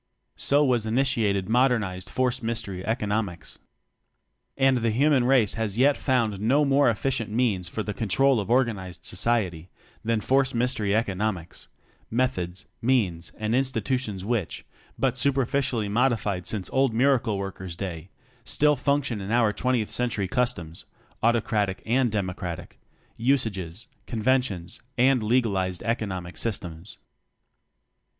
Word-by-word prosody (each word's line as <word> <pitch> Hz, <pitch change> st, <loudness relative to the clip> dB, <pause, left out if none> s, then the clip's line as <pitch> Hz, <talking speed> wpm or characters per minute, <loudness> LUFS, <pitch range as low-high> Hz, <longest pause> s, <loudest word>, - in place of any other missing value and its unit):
So 145 Hz, +1 st, +3 dB
was 120 Hz, -4 st, +1 dB
initiated 110 Hz, -6 st, +1 dB
modernized 110 Hz, -6 st, +1 dB
force 130 Hz, 0 st, 0 dB
mystery 105 Hz, -5 st, -3 dB
economics. 105 Hz, -5 st, -2 dB, 1.0 s
And 135 Hz, -2 st, +3 dB
the 115 Hz, 0 st, +1 dB
human 130 Hz, +2 st, +3 dB
race 125 Hz, -5 st, +4 dB
has 110 Hz, -3 st, -2 dB
as -, -, -4 dB
yet 140 Hz, +3 st, +4 dB
found 115 Hz, -7 st, 0 dB
no 135 Hz, +7 st, +3 dB
more 140 Hz, -1 st, +4 dB
efficient 115 Hz, -1 st, -1 dB
means 105 Hz, -6 st, 0 dB
for 110 Hz, -, -3 dB
the 105 Hz, -, -4 dB
control 125 Hz, +5 st, +2 dB
of 100 Hz, 0 st, -4 dB
organized 110 Hz, -8 st, 0 dB
society 90 Hz, -5 st, -1 dB, 0.3 s
than 115 Hz, 0 st, +1 dB
force 135 Hz, +3 st, +1 dB
mystery 115 Hz, -4 st, +1 dB
economics; 100 Hz, -5 st, -2 dB, 0.4 s
meth 125 Hz, -1 st, +1 dB
ods, 90 Hz, +1 st, -6 dB, 0.2 s
means, 100 Hz, -10 st, +1 dB
and 110 Hz, +1 st, -2 dB
institutions 130 Hz, -6 st, -1 dB
which, 110 Hz, -5 st, -2 dB, 0.3 s
but 130 Hz, -1 st, +1 dB
superficially 135 Hz, -4 st, +1 dB
modified 105 Hz, -4 st, 0 dB
since 100 Hz, -4 st, -2 dB
old 130 Hz, -3 st, +2 dB
Miracle 120 Hz, -4 st, +2 dB
worker's 95 Hz, -3 st, -6 dB
day, 85 Hz, -2 st, -6 dB, 0.3 s
still 150 Hz, 0 st, +3 dB
function 140 Hz, -5 st, 0 dB
in 95 Hz, -, -6 dB
our 115 Hz, -2 st, +3 dB
twentieth 120 Hz, 0 st, 0 dB
century 115 Hz, -5 st, -1 dB, 0.9 s
(autocratic 110 Hz, -4 st, +1 dB
and 120 Hz, +1 st, +2 dB
democratic) 90 Hz, -4 st, -4 dB
customs, -, -, -34 dB
usages, 110 Hz, -6 st, -1 dB, 0.2 s
conven 125 Hz, +3 st, +2 dB
tions, 90 Hz, -8 st, -6 dB, 0.2 s
and 130 Hz, 0 st, +4 dB
legalized 105 Hz, -6 st, 0 dB
economic 95 Hz, -6 st, -3 dB
systems. 90 Hz, -4 st, -4 dB
115 Hz, 130 wpm, -26 LUFS, 100-130 Hz, 1.0 s, race